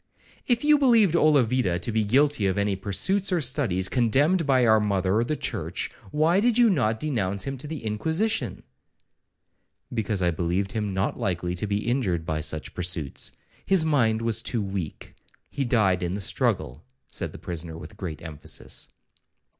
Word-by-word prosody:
'If 240 0 +1
you 300 0 +5
believed 230 - +4
Olavida 130 - +3
to 100 - -2
be 110 0 +1
guilty 130 0 +2
of 95 - -1
any 100 -1 +1
pursuits 185 - 0
or 180 - +2
studies 120 - 0
condemned 145 - +2
by 130 -3 +4
our 110 -1 +5
mother 100 +1 +1
the 155 +6 -1
church, - - -3 0.2
why 160 - +2
did 235 +2 +2
you 240 -3 +5
not 110 - +1
denounce 100 -10 -1
him 135 0 -4
to 150 - -7
the 155 -6 -6
Inquisition?'—'Because 110 - -4
I 90 - +3
believed 90 +4 -1
him 105 -3 -3
not 95 - -1
likely 90 -1 -1
to 90 +4 -3
be 100 +1 -1
injured 100 -10 0
by 80 -2 -2
such 80 0 -3
pursuits; 85 -6 -1 0.3
his 190 -4 +3
mind 115 -7 +2
was 115 -1 +1
too 115 -2 -1
weak,—he 100 - -6
died 100 -7 +2
in 90 +1 -2
the 100 - -4
struggle,' 70 -5 -1 0.2
said - - -4
the - - -10
prisoner 85 -1 -5
with 80 +1 -10
great 85 -6 -6
emphasis. 80 -4 -7
110 Hz, 160 wpm, -25 LUFS, 95-145 Hz, 0.3 s, you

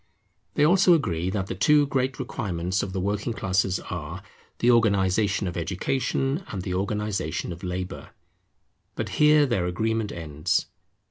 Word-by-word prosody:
They 145 - +4
also 180 +1 +6
agree 90 - -1
that 95 -1 -2
the - - -4
two 145 +10 +4
great 135 -1 -1
requirements 90 0 -2
of 95 - -4
the 95 - -3
working 105 +4 -1
classes 95 -2 0
are, 85 +2 -5 0.3
the 120 - +4
organization 100 -3 +2
of 85 - -4
Education, 135 - -1
and 95 -4 -5
the 90 - -3
organization 100 -3 -2
of 85 - -12
Labour. 90 -1 -5 0.9
But - - -3
here 150 0 +5
their 100 -10 0
agreement 110 +4 -1
ends. 75 -2 -1
100 Hz, 145 wpm, -25 LUFS, 90-120 Hz, 0.9 s, also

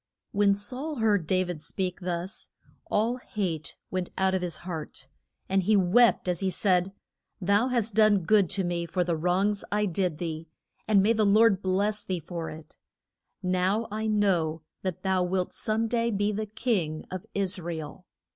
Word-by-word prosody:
When 200 0 +3
Saul 255 +10 -4
heard 210 - +1
Da 185 +1 +2
vid 175 -4 -5
speak 185 +2 -3
thus, 180 +2 -4 0.4
all 230 +4 +1
hate 180 - -4
went 185 -1 -2
out 190 0 +2
of 190 - 0
his 175 -3 -3
heart, 155 -6 -6 0.4
and 195 0 +2
he 210 +4 +3
wept 200 +4 +4
as 175 -2 0
he 195 - 0
said, 185 -1 +1 0.5
Thou 200 +5 +2
hast 235 -4 0
done 215 -3 +4
good 200 0 +4
to 195 - 0
me 175 -1 -2
for 180 +2 0
the 170 -1 0
wrongs 185 +5 +1
I 210 0 +2
did 180 -3 -1
thee, 165 -1 -4 0.4
and 205 -3 +5
may 220 +3 +4
the 220 -1 +2
Lord 205 -1 +5
bless 200 +3 +1
thee 185 -2 -2
for 165 +1 -5
it. 155 -1 -11 0.7
Now 185 +5 +1
I 220 +1 -2
know 175 -7 +1 0.2
that 185 -3 -4
thou 190 -1 +2
wilt 180 0 -1
some 220 0 0
day 235 0 +1
be 205 -1 0
the 215 +1 -3
king 200 -9 -1
of 185 -1 -6
Is 195 -1 0
ra 170 -1 -4
el. 155 -2 -8
190 Hz, 180 wpm, -27 LUFS, 175-210 Hz, 0.7 s, and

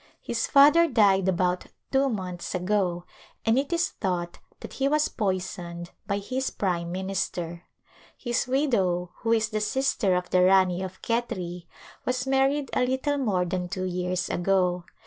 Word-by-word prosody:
His 230 -1 -1
father 300 +4 +6
died 200 - +3
about 180 0 0 0.2
two 270 0 +3
months 185 -5 -4
ago, 180 -1 0 0.4
and 225 +3 +4
it 280 +3 -3
is 340 0 +1
thought 175 -3 -3 0.2
that - - -8
he 275 - 0
was 300 +1 +2
poisoned 180 -4 -3 0.2
by 200 - 0
his 255 +6 -2
prime 170 -3 -2
minister. 180 -2 -3 0.5
His 240 0 -1
widow, 195 - +1
who 225 - -2
is 225 -1 +2
the 215 -1 -2
sister 210 -4 +1
of 180 0 -3
the 180 - +4
Rani 185 -1 +4
of 190 0 -7
Khetri, 185 -7 -3 0.4
was 255 0 -1
married 270 +1 +1
a - - +2
little 265 +3 0
more 195 -9 +1
than 180 0 -3
two 185 +1 -3
years 180 0 -2
ago. 180 -1 +1
195 Hz, 155 wpm, -26 LUFS, 180-255 Hz, 0.5 s, father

